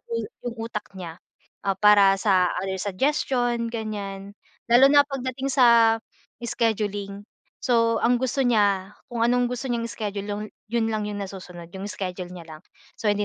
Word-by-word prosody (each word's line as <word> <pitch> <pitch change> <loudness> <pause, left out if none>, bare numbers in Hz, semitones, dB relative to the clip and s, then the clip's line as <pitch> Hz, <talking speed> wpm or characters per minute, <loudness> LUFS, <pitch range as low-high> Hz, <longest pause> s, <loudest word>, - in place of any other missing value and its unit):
u 230 - -7 0.3
'yong 235 -1 -4
utak 210 - -4
niya. 165 -2 -7 0.5
Ah, 195 - +2
para 200 -1 +6
sa 185 -4 +3
other 190 0 -3
suggestion 240 +2 0
ganyan. 200 -3 -5 0.4
Lalo 260 +3 +7
na 285 0 +6
pagdating 265 -1 -4
sa 230 -3 +5 0.4
scheduling. 205 -4 -2 0.4
So, 230 -2 +2
ang 245 +1 +3
gusto 260 +1 0
niya, 205 -3 +2 0.2
kung 235 -1 -2
anong 245 0 +2
gusto 250 +2 -4
niyang 235 -1 -1
schedule, 205 -3 -4
lon 205 +1 -3 0.3
'yon 230 -1 +1
lang 215 -1 -1
'yong 205 -1 -4
nasusunod, 180 -3 -9
'yong 195 +2 -6
schedule 180 -2 -5
niya 175 -2 -9
lang. - - -17 0.4
So, 215 - -1
hindi 205 0 0
215 Hz, 160 wpm, -24 LUFS, 195-240 Hz, 0.5 s, Lalo